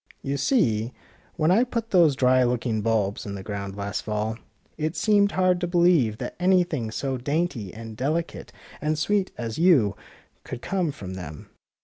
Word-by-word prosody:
You 140 +1 -1
see, 125 - +1 0.4
w^hen 160 0 +3
I 220 +6 +5
put 230 -2 -4
those 170 -7 +5
dry 130 0 +4
looking 120 -3 0
bulbs 105 -2 0
in 100 -1 -6
the 95 - -7
ground 100 -1 -5
last 100 0 -3
fall, 105 +1 -2 0.4
it 155 +2 -2
seemed 205 -2 +3
hard 185 -1 +2
to 175 - 0
believe 170 - +3
that - - -6
any 180 0 +4
thing 150 -11 -3
so 130 +4 -2
dainty 140 - -2
and 110 0 -9
delicate 155 +8 -2 0.3
and 155 +1 0
sweet 195 +5 +1
as 115 +1 -4
you 140 - +4 0.5
could 120 - -7
come 180 -4 0
from 95 -8 -8
them." 80 -5 -9
135 Hz, 170 wpm, -25 LUFS, 110-175 Hz, 0.5 s, I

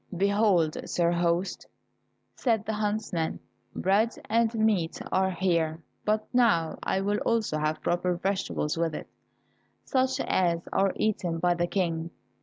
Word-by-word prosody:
"Behold, 200 -5 +3
sir 170 -1 +2
host," 175 +2 0 0.7
said 225 -4 0
the 220 - -2
huntsman, 210 -6 -2 0.4
"bread 200 +5 +2 0.2
and 230 0 +2
meat 210 -7 +1
are 190 0 +2
here 170 -3 0 0.3
but 215 0 +1
now 210 -10 +3
I 190 - 0
will 205 +1 0
also 220 -9 0
have 155 +1 -1
proper 175 +1 +1
vegetables 185 -4 -1
with 165 -2 0
it, - - -6 0.8
such 260 0 +1
as 170 -2 +1
are 195 0 +2
eaten 180 -6 0
by 175 +1 +2
the 175 0 0
King." 170 -3 -1
185 Hz, 135 wpm, -28 LUFS, 170-215 Hz, 0.8 s, Behold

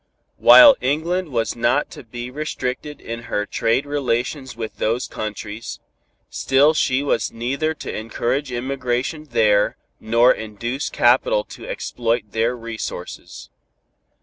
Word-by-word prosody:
While 290 -3 +9
England 165 +6 -1
was 115 -4 -1
not 125 +4 +1
to - - -10
be 120 +1 -7
restricted 150 0 -4
in 115 0 -7
her 105 - -1
trade 115 +6 0
relations 130 -2 -2
with 115 -1 -6
those 115 +3 0
countries, 110 +1 -6 0.5
still 140 +4 +3
she 135 -3 +1
was 140 -5 0
neither 140 +7 -2
to - - -6
encourage 120 +5 -2
emigration 130 +3 -2
there 110 -6 +2 0.2
nor 115 +3 +4
induce 115 +5 -4
capital - - +3
to - - -10
exploit 120 - -2
their 115 +2 0
resources. 115 -6 -7
125 Hz, 120 wpm, -21 LUFS, 115-145 Hz, 0.5 s, While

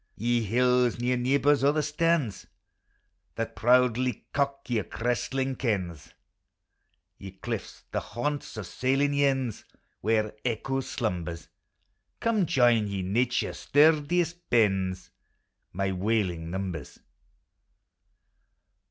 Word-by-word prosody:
Ye 120 +2 +1
hills, 125 +2 +2
near 125 +1 +1
ueebors 140 +3 +2
o' 140 - +5
the 155 0 0
starns, 150 - 0 0.9
That 115 - -4
proudly 125 0 +2
cock 140 0 -1
your 115 -5 0
cresting 130 +3 -2
cairns! 95 - -3 1.0
Ye 95 -1 -9
cliffs, 95 - -6
the - - 0
haunts 145 0 -4
of 110 - -4
sailing 135 +7 +1
yearns,* 135 -5 +1 0.4
Where 110 0 +1
echo 130 +3 -1
slumbers! 90 - -4 0.7
Come 220 -6 +1
join, 120 -6 +3
ye 100 -2 -3
Xature's 120 +6 0
sturdiest 160 +3 +3
bairns, 95 -5 +1 0.6
My 95 +1 -1
wailing 95 -4 -1
numbers! 90 -5 -5
120 Hz, 100 wpm, -27 LUFS, 100-140 Hz, 1.0 s, o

